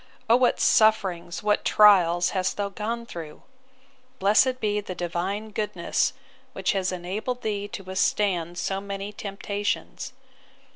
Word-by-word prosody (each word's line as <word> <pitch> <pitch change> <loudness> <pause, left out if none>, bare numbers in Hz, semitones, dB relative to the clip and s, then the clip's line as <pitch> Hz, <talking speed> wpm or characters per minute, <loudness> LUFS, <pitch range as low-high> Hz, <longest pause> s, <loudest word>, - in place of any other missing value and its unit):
O 230 - +6
what 250 0 +3
sufferings, 190 -6 +2
what 210 0 +2
trials, 180 -5 +5
hast 185 -1 -1
thou 200 -1 -1
gone 230 +4 -4
through! 165 -8 -9 0.7
Blessed 250 +6 +3
be 210 -2 0
the 185 -2 -7
Divine 185 +5 -3
goodness, 210 0 -1 0.4
which - - 0
has 190 -2 -1
enabled 205 +8 -4
thee 205 -2 -2
to 200 - -8
withstand 185 -2 0
so 195 +2 -2
many 200 +1 -6
temptations! 205 +5 -4
200 Hz, 130 wpm, -25 LUFS, 185-215 Hz, 0.7 s, O